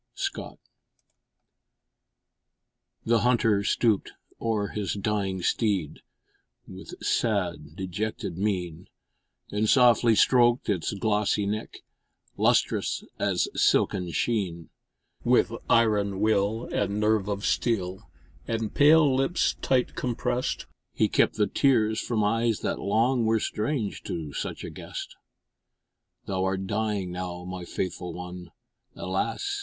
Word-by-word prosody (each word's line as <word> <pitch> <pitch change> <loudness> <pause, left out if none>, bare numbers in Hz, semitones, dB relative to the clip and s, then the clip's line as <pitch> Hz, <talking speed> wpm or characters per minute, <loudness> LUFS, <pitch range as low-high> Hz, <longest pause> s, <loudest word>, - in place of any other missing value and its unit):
Scott - - -4 2.5
The 115 0 +3
Hunter 115 -4 +2
stooped 110 -1 +1 0.3
o'er 110 -3 0
his 105 -2 -3
dying 100 -3 -1
steed 95 -10 0 0.7
With - - -10
sad 90 -9 -1
dejected 95 0 -4
mien, 90 -4 -2 0.6
And 105 +1 0
softly 120 -3 +5
stroked 120 +1 +4
its 90 -6 0
glossy 105 0 +1
neck, 105 +2 -4 0.5
Lustrous - - +1 0.2
as - - +1
silken 90 -2 +2
sheen; 90 -3 -2 0.5
With - - +3 0.2
iron 105 -4 +3
will 110 +2 +1
and 100 +1 0
nerve 105 -1 +2
of 100 -1 -3
steel, 95 -6 -1 0.4
And 115 -2 -2
pale 150 -1 +6
lips 135 +7 +1
tight 130 -2 +1
compressed, 125 0 -2 0.3
He - - +2
kept - - +2
the 105 - +2
tears 110 -1 +2
from 110 -3 -1
eyes 115 +1 +1
that - - -2
long 115 +5 +2
Were 110 0 +3
strange 110 0 -2
to 80 -4 -5
such - - -4
a - - -6
guest. - - -8 1.1
Thou'rt 95 0 -1
dying 105 -2 -1
now, 90 -1 -5
my 90 -1 -6
faithful 90 0 -4
one, 90 0 -8 0.5
Alas! 400 - -2
105 Hz, 110 wpm, -27 LUFS, 95-115 Hz, 2.5 s, pale